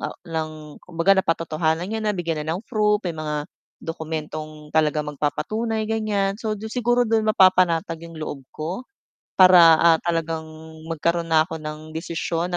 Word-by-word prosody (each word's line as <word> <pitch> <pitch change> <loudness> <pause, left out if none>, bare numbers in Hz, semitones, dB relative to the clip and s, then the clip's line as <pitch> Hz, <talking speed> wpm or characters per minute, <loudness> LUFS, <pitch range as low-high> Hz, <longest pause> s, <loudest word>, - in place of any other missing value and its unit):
ah, - - -5
ng 160 -1 -3 0.3
kumbaga 175 +2 +2
napa-totohanan 165 -1 -1
niya 220 - -2
na 210 -2 -1
bigyan 165 -3 -2
na 160 +3 -2
ng 205 - -9
proof, 210 -1 +2
may 175 - -1
mga 150 -2 -3 0.4
dokumentong 155 -1 -6
talagang 150 -1 +1
magpapatunay 220 +10 -2
ganyan, 205 -2 0
so 215 -2 -2
siguro 240 +1 +1
do 225 -1 +2
mapapanatag 185 -6 +3
'yong 165 - -12
loob 150 -2 -5
ko. 175 +11 -6 0.5
Para 180 -3 +8
ah, 165 0 +5
talagang 165 -2 -2 0.4
magkaroon 165 +1 -1
na 160 -1 +4
ako 160 -1 -7
ng 155 0 -6
desisyon 170 +2 -3
165 Hz, 150 wpm, -23 LUFS, 160-195 Hz, 0.5 s, Para